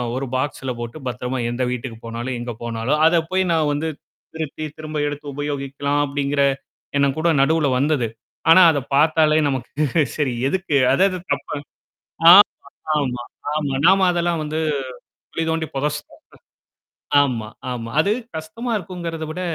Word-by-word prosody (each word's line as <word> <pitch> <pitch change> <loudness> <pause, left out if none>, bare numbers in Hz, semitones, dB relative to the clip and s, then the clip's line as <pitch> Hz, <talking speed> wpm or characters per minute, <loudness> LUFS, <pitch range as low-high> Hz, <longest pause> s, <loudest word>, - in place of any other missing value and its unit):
ஒரு 135 +1 -2
பாக்ஸ்ல 130 0 -2
போட்டு, 120 +3 -6
பத்திரமா, 125 +1 -3
எந்த 125 +1 -1
வீட்டுக்கு 125 -2 -5
போனாலும், 120 +3 -4
எங்க 120 0 -5
போனாலும் 120 +6 -1
அத 165 0 +3
போய் 190 0 +2
நான் 155 -2 +2
வந்து 160 +3 -2 0.5
திருத்தி, 155 -1 -4
திரும்ப 155 0 -5
எடுத்து 145 0 -6
உபயோகிக்கலாம் 140 0 -2
அப்படிங்கிற 140 0 0 0.6
எண்ணம் 140 -1 +2
கூட 165 +2 +2
நடுவுல 155 +1 +2
வந்தது. 140 -4 +1 0.4
ஆனா 185 +3 +9
அத 145 - -1
பாத்தாலே 155 +1 +4
நமக்கு 140 +3 0
சரி 140 -5 0
எதுக்கு? 185 -2 -1 0.2
அது 140 - +3
அது 185 - -4
தப்பு - - -3 0.8
ஆமா, 195 - +11 0.6
ஆமா-ஆமா. 140 +2 -3
நாம 190 +1 +5
அதெல்லாம் 170 -1 0
வந்து 155 +1 -3 0.7
குழி 165 - -2
தோண்டி 160 0 -1
புதைச்டோம் 150 +2 -3 1.1
ஆமா 120 -6 -2 0.2
ஆமா. 115 -2 -4
அது 195 - +1 0.3
கஷ்டமா 160 +10 -5
இருக்குங்கிறத 170 -3 -5
விட 180 - -5
145 Hz, 140 wpm, -21 LUFS, 130-160 Hz, 1.1 s, ஆமா